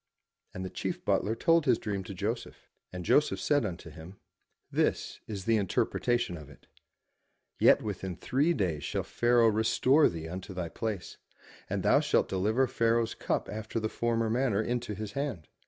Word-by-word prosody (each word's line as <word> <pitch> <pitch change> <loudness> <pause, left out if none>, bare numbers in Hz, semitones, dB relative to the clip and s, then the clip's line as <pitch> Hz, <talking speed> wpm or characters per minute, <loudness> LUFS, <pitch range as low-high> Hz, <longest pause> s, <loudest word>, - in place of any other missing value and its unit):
'* - - -47
And 95 0 -4
the 95 - -6
chief - - -4
butler 110 +2 +1
told 165 +3 +3
his 120 -3 +5
dream 100 -4 -3
to 100 - -7
Joseph. 110 +6 -4 0.2
And 90 -1 -6
Joseph 150 - +3
said 145 -2 +2
unto 90 -4 -5
him, 80 +5 -11 0.5
"This - - 0
is 100 -4 -5
the 115 -1 +3
interpretation 105 +1 0
of 75 -3 -11
it: - - -17 0.9
Yet - - +5
within 95 -3 -4
three 145 - +1
days 85 -7 -1
shall - - -2
Pharaoh 120 -1 +3
restore 120 +7 +4
thee 80 -1 -6
unto 95 +2 -7
thy 90 -2 -3
place: 110 -3 -4 0.5
and - - -2
thou - - +5
shalt - - +2
deliver 105 +7 +2
Pharaoh's 115 -1 +1
cup - - -2
after 110 +2 -4
the 110 0 -2
former 115 0 0
manner 120 -4 +1
into 120 -2 -2
his 105 0 -5
hand. 125 - -4
110 Hz, 170 wpm, -30 LUFS, 95-120 Hz, 0.9 s, his